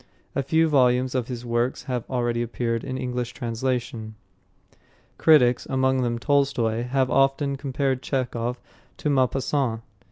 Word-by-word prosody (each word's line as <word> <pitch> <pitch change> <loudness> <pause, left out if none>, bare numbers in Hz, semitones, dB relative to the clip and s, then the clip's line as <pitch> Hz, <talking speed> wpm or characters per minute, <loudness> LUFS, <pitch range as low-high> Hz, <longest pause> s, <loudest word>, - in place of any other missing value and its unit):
A 140 - 0
few 160 +4 +2
volumes 130 -3 +3
of 125 -3 -1
his 125 -1 -6
works 120 +2 -1
have 125 -4 -4
already 120 -2 0
appeared 115 -1 -2
in 130 -1 -4
English 125 -1 -3
translation. 120 -2 -3 1.0
Critics, 125 -6 +5
among 130 0 +2
them 120 -1 0
Tolstoy, 120 -4 +1
have 130 +1 0
often 135 +1 +2
compared 135 -1 -1
Chekhov 125 -3 -2 0.4
to 150 - -1
Maupassant. 130 -2 +1
125 Hz, 130 wpm, -24 LUFS, 120-135 Hz, 1.0 s, Critics